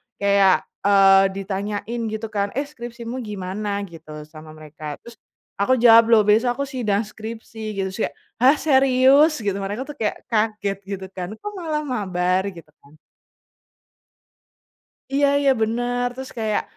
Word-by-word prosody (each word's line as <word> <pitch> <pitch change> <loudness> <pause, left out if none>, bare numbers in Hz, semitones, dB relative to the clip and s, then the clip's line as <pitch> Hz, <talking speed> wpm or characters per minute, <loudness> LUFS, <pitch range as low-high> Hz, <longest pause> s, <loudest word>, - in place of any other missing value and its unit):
kayak, 200 -1 +3 0.2
eee, 195 -1 +6
ditanyain 205 +4 -4
gitu 220 +1 -4
kan, 200 -1 0
"Eh, 280 - 0
skripsimu 240 -3 -8
gimana?" 205 -1 -4
gitu 155 -4 -10
sama 155 0 -13
mereka. 155 -1 -8
Terus, 235 -1 -12 0.4
aku 255 +6 +3
jawab, 230 -1 +7
"Loh 225 -2 +5
besok 225 +4 +3
aku 280 - -2
sidang 225 -6 -1
skripsi," 220 +1 -9 0.2
gitu. 190 -1 -1
Terus 190 - -9
kayak, - - -16 0.2
"Hah, 260 +5 +6
serius?" 270 0 +4
Gitu. 200 -2 -1
Mereka 205 +6 -4
tuh 295 +1 -9
kayak 215 - -2
kaget 210 -3 0
gitu 195 -1 -5
kan, 185 +2 -6
"Kok 415 - -7
malah 310 -3 -2
mabar?" 190 -7 -1
Gitu 170 -5 -9
kan. 145 +2 -21 2.2
Iya 285 +1 +3
iya, 275 -1 +4
bener. 245 +2 0
Terus 265 0 -7
kayak, 220 -3 -1
215 Hz, 145 wpm, -22 LUFS, 195-245 Hz, 2.2 s, jawab